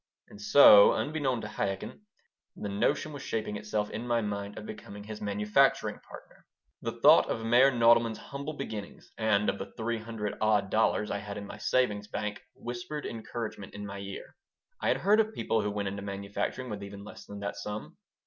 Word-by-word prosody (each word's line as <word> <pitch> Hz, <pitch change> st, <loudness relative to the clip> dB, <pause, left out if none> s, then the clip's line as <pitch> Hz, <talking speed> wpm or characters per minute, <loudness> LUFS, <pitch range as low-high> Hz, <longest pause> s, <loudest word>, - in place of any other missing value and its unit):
And 105 Hz, -, -12 dB
so, 105 Hz, -3 st, +8 dB
unbeknown 145 Hz, -6 st, -1 dB
to -, -, -5 dB
Chaikin, 105 Hz, -, -4 dB, 0.5 s
the 105 Hz, -, -5 dB
notion 105 Hz, +9 st, 0 dB
was 140 Hz, -, -7 dB
shaping 110 Hz, -3 st, -3 dB
itself 105 Hz, 0 st, -2 dB
in 115 Hz, +3 st, -5 dB
my 120 Hz, -1 st, +2 dB
mind 100 Hz, -1 st, -4 dB
of 105 Hz, -, -7 dB
becoming 105 Hz, -1 st, -9 dB
his 105 Hz, 0 st, -8 dB
manufacturing 105 Hz, +1 st, +2 dB
partner. -, -, -15 dB, 0.3 s
The -, -, -3 dB
thought -, -, +7 dB
of 115 Hz, -, -2 dB
Meyer 120 Hz, +4 st, +6 dB
Nodelman's 115 Hz, -2 st, +4 dB
humble 140 Hz, +2 st, -6 dB
beginnings 110 Hz, -8 st, -7 dB
and 105 Hz, -2 st, +2 dB
of -, -, 0 dB
the -, -, -6 dB
three 115 Hz, 0 st, -2 dB
hundred 110 Hz, -2 st, -5 dB
odd 105 Hz, -3 st, +2 dB
dollars 110 Hz, -1 st, +2 dB
I 100 Hz, -, -1 dB
had 100 Hz, 0 st, -7 dB
in 100 Hz, -, -6 dB
my 105 Hz, -, -9 dB
savings 105 Hz, -4 st, +1 dB
bank 105 Hz, 0 st, -4 dB
whispered 120 Hz, +5 st, -6 dB
encouragement 110 Hz, -3 st, -6 dB
into 105 Hz, 0 st, -6 dB
my 100 Hz, 0 st, -6 dB
ear. 100 Hz, 0 st, -8 dB, 0.5 s
I -, -, 0 dB
had -, -, +3 dB
heard 210 Hz, +2 st, +4 dB
of 220 Hz, 0 st, +1 dB
people 110 Hz, -, 0 dB
who 105 Hz, -, -1 dB
went 100 Hz, 0 st, -2 dB
into 100 Hz, +1 st, -4 dB
manufacturing 100 Hz, +5 st, -4 dB
with 105 Hz, -1 st, -5 dB
even 100 Hz, 0 st, -8 dB
less 105 Hz, -, -11 dB
than 100 Hz, 0 st, -8 dB
that 100 Hz, -, -3 dB
sum. 105 Hz, +1 st, -6 dB
105 Hz, 190 wpm, -29 LUFS, 100-120 Hz, 0.5 s, so